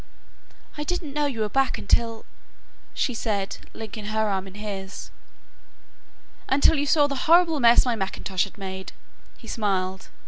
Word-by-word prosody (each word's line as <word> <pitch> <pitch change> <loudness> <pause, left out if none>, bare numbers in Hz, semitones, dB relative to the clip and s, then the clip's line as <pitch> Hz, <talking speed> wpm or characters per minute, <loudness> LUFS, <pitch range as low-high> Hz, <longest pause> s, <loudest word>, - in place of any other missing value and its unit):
"I - - -1
didn't 315 -3 -3
know 295 0 +1
you 240 -6 -3
were 215 - +1
back 270 +5 +1
until 230 +2 0 0.3
" - - -32
she 255 - 0
said; 205 -4 -2
linking 215 -1 -7
her 215 +1 0
arm 195 -1 -2
in 190 - -12
his. 200 -2 -6 1.4
"Until 280 +4 +5
you 290 - 0
saw 295 0 +5
the 290 +4 -3
horrible 335 -2 +5
mess 235 0 +6
my 245 -2 +1
mackintosh 190 -2 -1
has 200 - -14
made," 190 -1 -6 0.4
he 230 - -14
smiled. 190 -4 -2
220 Hz, 160 wpm, -25 LUFS, 195-275 Hz, 1.4 s, mess